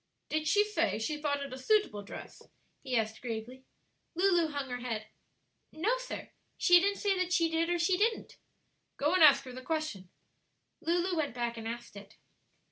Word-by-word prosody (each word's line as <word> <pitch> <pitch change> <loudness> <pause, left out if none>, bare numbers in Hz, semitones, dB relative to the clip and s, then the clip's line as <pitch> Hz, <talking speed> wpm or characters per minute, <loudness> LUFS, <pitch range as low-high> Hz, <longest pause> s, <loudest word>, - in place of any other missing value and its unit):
"Did 310 0 -1
she 415 +4 +5
say 420 - 0
she 295 +8 -2
thought 285 -2 0
it 275 -2 -7
a 260 - -7
suitable 260 - +2
dress?" 200 - -10 0.4
he 260 -3 -1
asked 220 0 -2
gravely. 245 +2 -6 0.5
Lulu 350 -2 +3
hung 285 -3 -4
her 245 - -3
head. 225 -3 -4 0.7
"No, 405 +11 +1
sir; - - -7 0.3
she 355 -1 +6
didn't 400 +2 +1
say 400 -2 +1
that 365 -1 -1
she 335 -2 +3
did 330 +1 +1
or 350 - +1
she 360 +2 +2
didn't." 445 +3 0 0.6
"Go 295 +4 +1
and 370 -3 +5
ask 285 -2 +7
her 260 - -9
the 255 - -8
question." 305 - -3 0.7
Lulu 350 +2 0
went 290 -7 -1
back 240 -1 -2
and 225 -1 -6
asked 235 -1 -7
it. 200 +1 -12
300 Hz, 185 wpm, -31 LUFS, 240-350 Hz, 0.7 s, ask